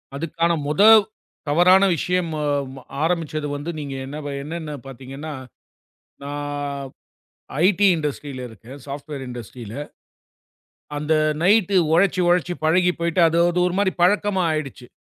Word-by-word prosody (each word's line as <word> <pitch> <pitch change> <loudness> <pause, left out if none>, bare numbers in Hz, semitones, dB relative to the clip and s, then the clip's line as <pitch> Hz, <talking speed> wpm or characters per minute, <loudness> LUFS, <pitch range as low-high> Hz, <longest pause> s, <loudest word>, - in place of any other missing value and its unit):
அதுக்கான 165 +3 -1 0.2
மொத 150 +5 +1 0.7
தவறான 180 +5 +5
விஷயம் 180 +1 -1 0.7
ஆரம்பிச்சது 160 -3 -1
வந்து 145 +4 -5
நீங்க 140 -2 -5
என்ன 145 +3 -7 0.3
என்னென்ன 160 0 -6 0.2
பாத்தீங்கன்னா, 135 +4 -8 0.9
நான் 145 -1 -4 0.8
ஐடீ 200 +1 +4
இண்டஸ்ட்ரில 145 -4 -4
இருக்கேன் 115 +5 -12
சாப்ட்வேர் 140 0 -6
இண்டஸ்ட்ரில. 120 -2 -8 1.2
அந்த 150 +2 0 0.3
நைட்டு 200 0 +4 0.2
உழைச்சு 180 +1 +3
உழைச்சு 175 0 +2
பழகிப் 180 +3 +2
போயிட்டு, 170 +1 +1
அது 165 +1 0 0.3
ஒரு 180 - -4
மாதிரி 200 -2 +2
பழக்கமா 200 0 +2
ஆயிடுச்சு. 135 -5 -5
155 Hz, 110 wpm, -22 LUFS, 140-180 Hz, 1.2 s, தவறான